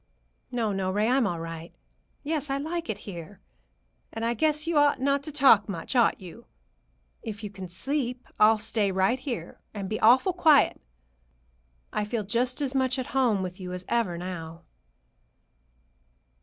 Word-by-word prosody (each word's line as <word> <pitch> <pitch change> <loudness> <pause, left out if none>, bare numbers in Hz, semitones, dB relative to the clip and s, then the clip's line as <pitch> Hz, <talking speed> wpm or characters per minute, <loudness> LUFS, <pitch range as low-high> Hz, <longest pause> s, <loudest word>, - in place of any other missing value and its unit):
"No, 230 -4 0
no, 190 -1 -1
Ray. 210 +3 +1
I'm 255 -2 +3
all 170 -3 -3
right. 165 0 -8 0.5
Yes, 300 -1 -2
I 275 - 0
like 325 +3 -4
it 210 - -2
here. 180 0 -9 0.7
And 225 0 -4
I 235 - +1
guess 300 +4 +1
you 335 0 -1
ought 290 -2 +3
not 280 +1 +1
to 310 - -5
talk 265 -8 +5
much, 180 +6 -5
ought 240 -2 +3
you? 190 +5 -12 0.7
If 220 -2 -7
you 205 - -5
can 190 -2 -8
sleep, 250 - -3
I'll 215 +1 +6
stay 210 -2 0
right 190 +7 +1
here, 255 -3 -6 0.2
and 200 -2 -4
be 215 +2 -3
awful 260 - +5
quiet. 315 -5 +4 1.1
I 210 - 0
feel 215 +1 -2
just 245 +7 -1
as 275 -2 -1
much 260 -1 +1
at 260 - -2
home 240 -8 +2
with 180 +1 -6
you 180 -1 -6
as 180 0 -5
ever, 225 -8 0
now." 170 -2 -7
225 Hz, 170 wpm, -27 LUFS, 190-270 Hz, 1.1 s, I'll